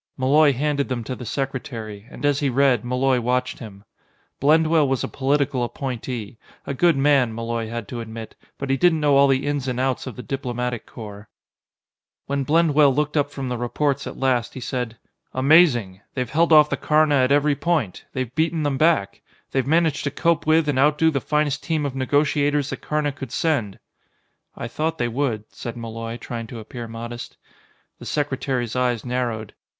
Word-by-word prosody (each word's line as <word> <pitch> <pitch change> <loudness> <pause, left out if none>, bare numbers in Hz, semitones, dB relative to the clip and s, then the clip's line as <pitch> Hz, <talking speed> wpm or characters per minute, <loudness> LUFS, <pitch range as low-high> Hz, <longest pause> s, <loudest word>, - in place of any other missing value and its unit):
Malloy 145 +3 +4
handed 140 +1 -1
them 125 -2 -2
to 130 - -5
the 125 - -8
secretary, 115 -6 -5
and - - -6
as 145 -1 +2
he 145 - +1
read, 130 -3 +3
Malloy 125 +1 +1
watched 125 +2 -1
him. 100 -4 -10 0.6
Blendwell 155 +1 +4
was 135 -1 0
a - - -1
political 140 -1 0
appointee 120 -2 -5 0.3
a 140 - -3
good 165 +2 +3
man, 135 -5 +3
Malloy 115 -1 -3
had 115 -2 -5
to 120 - -5
admit, 110 0 -8 0.2
but 140 -1 -3
he 135 - +2
didn't 165 +1 +3
know 145 -2 +3
all 140 0 +6
the 135 0 +1
ins 145 -2 -1
and 125 -1 -2
outs 130 0 -1
of 130 - -6
the 125 - -8
Diplomatic 125 -3 -3
Corps. 105 -2 -10 1.0
When 140 0 -1
Blendwell 150 -1 +4
looked 150 +1 0
up 145 -1 +2
from 135 -2 -5
the 125 -1 -3
reports 135 +3 -1
at - - -7
last, 125 -3 0
he - - -5
said: 125 -2 -4 0.4
"Amazing! 130 - +4
They've 125 -2 -1
held 165 +2 +2
off 150 -1 +7
the - - 0
Karna 155 -1 +3
at 130 0 +3
every 145 0 +3
point! 155 - -1
They've 130 -2 -4
beaten 160 +1 0
them 140 -2 -1
back! 155 -11 +2 0.3
They've 135 -1 0
managed 160 -1 +2
to - - +1
cope 165 +3 0
with 160 0 +4
and 140 -3 +1
outdo 150 +3 +4
the 135 -3 -1
finest 150 0 0
team 155 -3 -1
of 135 -2 -3
negotiators 145 +1 +1
the - - -3
Karna 150 -1 -1
could 135 -3 -8
send." 130 -12 0 0.8
"I 115 - -5
thought 160 +6 -2
they 120 - 0
would," 120 -3 -1
said 120 0 -6
Malloy, 115 0 -6
trying 115 -1 -6
to 120 - -8
appear 115 +2 -7
modest. 120 +1 -7 0.6
The - - -10
secretary's 130 -5 -2
eyes 125 -3 0
narrowed. 120 -4 -2
135 Hz, 185 wpm, -23 LUFS, 120-145 Hz, 1.0 s, off